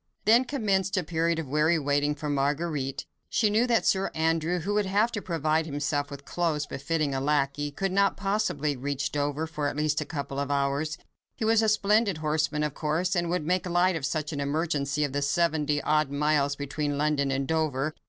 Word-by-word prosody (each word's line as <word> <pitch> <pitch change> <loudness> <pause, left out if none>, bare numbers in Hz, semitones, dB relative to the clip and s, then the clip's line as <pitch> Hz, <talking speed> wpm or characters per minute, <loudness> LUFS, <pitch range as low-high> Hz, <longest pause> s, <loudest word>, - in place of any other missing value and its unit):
Then 230 +5 +5
commenced 200 -7 0
a 185 - +1
period 165 +1 0
of 160 - -3
weary 150 +4 +2
waiting 145 0 +1
for 150 - -5
Marguerite. 145 -1 -1 0.2
She 215 -2 +2
knew 225 +4 +3
that 235 -2 +2
Sir 195 0 +2
Andrew—who 165 +4 0
would 205 -1 +1
have 210 +5 +2
to 210 - -3
provide 160 -2 0
himself 145 0 -1
with 140 -1 -9
clothes 160 -3 -1
befitting 145 +1 -2
a 135 - -1
lacquey—could 145 +5 0
not 200 +1 +2
possibly 195 -8 0
reach 140 +1 -3
Dover 145 +1 -1
for 150 -2 -3
at 145 - -4
least 155 +1 +1
a - - -3
couple 140 -3 -4
of 140 0 -2
hours. 140 +3 0 0.4
He 220 - -3
was 225 0 +4
a 220 - +3
splendid 210 -2 +2
horseman 155 -1 0
of 150 -2 -1
course, 165 +6 -1
and 175 -1 0
would 175 -3 -1
make 180 +2 0
light 175 +1 +3
in 160 - -3
such 150 +2 -2
an 145 - -3
emergency 145 0 -1
of 145 -2 -2
the 145 - 0
seventy 150 -1 +1
odd 150 -1 +2
miles 145 0 +1
between 145 +1 -3
London 145 -1 +1
and 135 0 -1
Dover. 155 -2 0
155 Hz, 195 wpm, -27 LUFS, 145-175 Hz, 0.4 s, Then